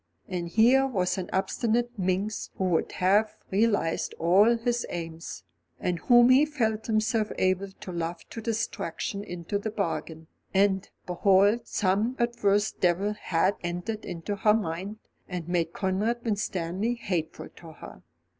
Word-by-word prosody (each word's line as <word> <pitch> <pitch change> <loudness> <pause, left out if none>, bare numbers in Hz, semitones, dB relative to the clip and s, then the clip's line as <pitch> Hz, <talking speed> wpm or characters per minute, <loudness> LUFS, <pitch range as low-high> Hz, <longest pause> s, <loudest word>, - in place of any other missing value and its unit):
And 175 -2 -3
here 245 +8 +4
was 190 -7 0
an 180 - -5
obstinate 230 +5 0
minx 195 +2 -1
who - - -2
would 165 - 0
have 210 +4 +2
realised 200 -5 +1
all 200 +8 +4
his 240 +1 -1
aims, 165 - -6 0.4
and 180 -2 -1
whom 240 +4 +6
he 260 +3 +7
felt 220 -8 -1
himself 215 0 +1
able 185 +1 +1
to 190 0 -10
love 170 0 -4
to 225 - -6
distraction 210 -3 -3
into 180 +2 -4
the 220 - -3
bargain; 165 -5 -3 0.3
and, 195 -1 +2 0.2
behold, 195 +5 +3
some 205 +5 +1
adverse 210 -4 +1
devil 190 +4 +1
had 185 -1 0
entered 180 +6 -4
into 175 +4 -5
her 210 +1 +4
mind, 195 +1 -3 0.3
and 180 -3 -5
made 170 -2 0
Conrad 210 +6 -1
Winstanley 200 0 -1
hateful 180 -9 -4
to 165 -2 -12
her. - - -12
200 Hz, 140 wpm, -27 LUFS, 180-220 Hz, 0.4 s, he